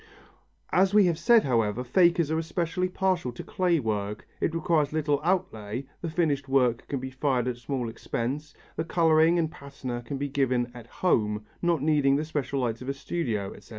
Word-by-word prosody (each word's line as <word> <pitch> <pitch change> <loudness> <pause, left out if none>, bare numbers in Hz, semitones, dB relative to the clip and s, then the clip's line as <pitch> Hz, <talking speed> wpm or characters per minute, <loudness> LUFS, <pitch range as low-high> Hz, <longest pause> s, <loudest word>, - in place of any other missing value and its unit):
As 190 +2 +3
we 210 -2 +7
have 170 -2 +1
said, 230 +5 +5
however, 115 -2 +1
fakers 170 +3 +3
are 160 - +1
especially 170 +2 -1
partial 185 -7 0
to - - -7
clay 180 -3 +1
work. 105 -3 -3
It 165 - 0
requires 160 -3 +1
little 150 -2 0
outlay, 135 - -1 0.2
the 170 - -3
finished 150 -4 0
work 125 -3 +2
can 140 - -2
be 130 +1 -6
fired 130 -2 0
at 125 -1 -2
small 125 -1 -3
expense, 130 +6 -4 0.2
the 160 - -1
colouring 165 0 +4
and 160 -2 0
patina 130 -4 -6
can 135 +4 -5
be 140 +1 -2
given 130 -3 0
"at 120 -2 -11
home," 105 - 0 0.2
not 170 -5 +1
needing 145 -3 +3
the 150 +2 0
special 140 -3 -2
light 115 -1 -2
of 130 - -5
a 140 - -2
studio, 120 - -3
etc. - - -16
140 Hz, 185 wpm, -27 LUFS, 125-165 Hz, 0.2 s, we